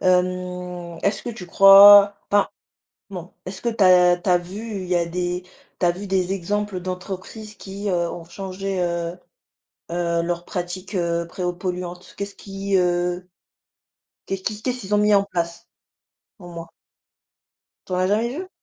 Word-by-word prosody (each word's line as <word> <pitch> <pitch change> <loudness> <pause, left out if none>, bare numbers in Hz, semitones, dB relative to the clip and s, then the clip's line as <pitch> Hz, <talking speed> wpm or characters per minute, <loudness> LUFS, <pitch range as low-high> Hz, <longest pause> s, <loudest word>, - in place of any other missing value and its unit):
Hem, 180 -1 -1
est-ce 200 0 0
que 240 - -4
tu 195 -6 -9
crois 200 +2 +8
enfin, 205 0 +3 0.6
non. 180 -2 -8
Est-ce 190 +1 -7
que 240 - -1
tu 225 -4 +2
as 180 -1 +6
tu 180 +2 -2
as 180 - +5
vu, 200 +4 -6
il 185 - -7
y 180 - +1
a 170 - +2
des 175 +1 -3 0.4
tu - - 0
as - - +5
vu 185 +4 -6
des 190 -1 0
exemples 200 +1 -2
d'entreprises 185 +4 -7
qui, 200 +1 -5
heu, 170 -2 0
ont 170 - -8
changé, 190 +1 -5
heu 170 0 -2 0.7
heu, 170 -1 0
leurs 175 0 -3
pratiques, 180 +2 -5
heu, 170 -2 0
préo 180 0 -3
polluantes? 180 0 -6
Qu'est-ce 200 0 -5
qui, 195 0 -3
heu, 180 0 0 1.0
qu'est-ce 195 -1 -4
qui 210 +1 -3
qu'est-ce 250 -1 -2
qu'ils 205 -1 -2
ont 205 - +4
mis 210 0 +4
en 200 0 +4
place 170 -2 -4 0.7
au 180 - -12
moins? 165 -1 -9 1.2
Tu - - -8
en - - +1
as 185 0 +2
jamais 215 +4 +1
vues? 370 +1 -6
185 Hz, 170 wpm, -22 LUFS, 175-200 Hz, 1.2 s, crois